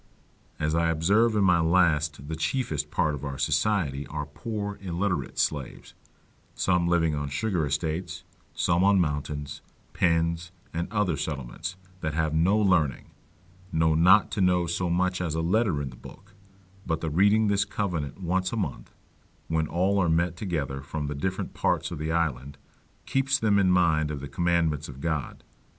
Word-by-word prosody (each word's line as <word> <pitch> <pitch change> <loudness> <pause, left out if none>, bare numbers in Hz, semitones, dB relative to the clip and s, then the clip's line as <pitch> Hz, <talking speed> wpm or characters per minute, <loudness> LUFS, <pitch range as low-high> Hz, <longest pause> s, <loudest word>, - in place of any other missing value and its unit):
As 75 +1 0
I 85 0 +2
observe 100 +8 +3
in 105 - +3
my 90 -3 +4
last 80 -4 +2
the 80 - -3
chiefest 80 - -2
part 80 -1 +1
of 70 -1 -6
our 70 -2 -4
society 75 -7 0
are 75 -1 -4
poor 100 +6 -5
illiterate 90 +1 -2
slaves, 70 -5 -2 0.6
some 90 -2 +1
living 85 -2 +2
on 75 -1 -3
sugar 85 +1 -1
estates, 80 +5 -3 0.3
some 85 +1 +2
on 100 0 +5
mountains, 75 -2 -2 0.3
pens, 85 0 +1 0.2
and 85 +3 -3
other 105 -6 +1
settlements, 75 +4 -5 0.2
that 80 -3 -3
have 80 -1 0
no 85 +7 +3
learning, 90 - +1 0.6
no 80 0 +2
not 90 +6 +5
to 100 - -1
know 90 -1 +3
so 85 +1 -1
much 90 +1 0
as 80 -3 -2
a 80 - 0
letter 90 -3 +1
in 65 - -5
the - - -12
book; - - -14 0.5
but 80 -4 -2
the 80 - -2
reading 100 +6 +4
this 100 -1 +2
covenant 85 -9 -3
once 90 +1 0
a 115 - -3
month, 85 - -4 0.5
when 80 -1 0
all 95 +5 +1
are 90 -3 +2
met 85 +2 +1
together 75 -8 -3
from 75 +2 -4
the 75 - -3
different 95 +7 -3
parts - - 0
of - - -5
the 80 +1 -2
island, 70 -4 -1 0.5
keeps 135 0 +1
them 105 -2 +2
in 95 -2 +3
mind 80 -4 +3
of 75 -2 -4
the 70 - -6
commandments 80 -1 0
of 70 0 -10
God. 80 -3 -3
85 Hz, 170 wpm, -27 LUFS, 75-95 Hz, 0.6 s, on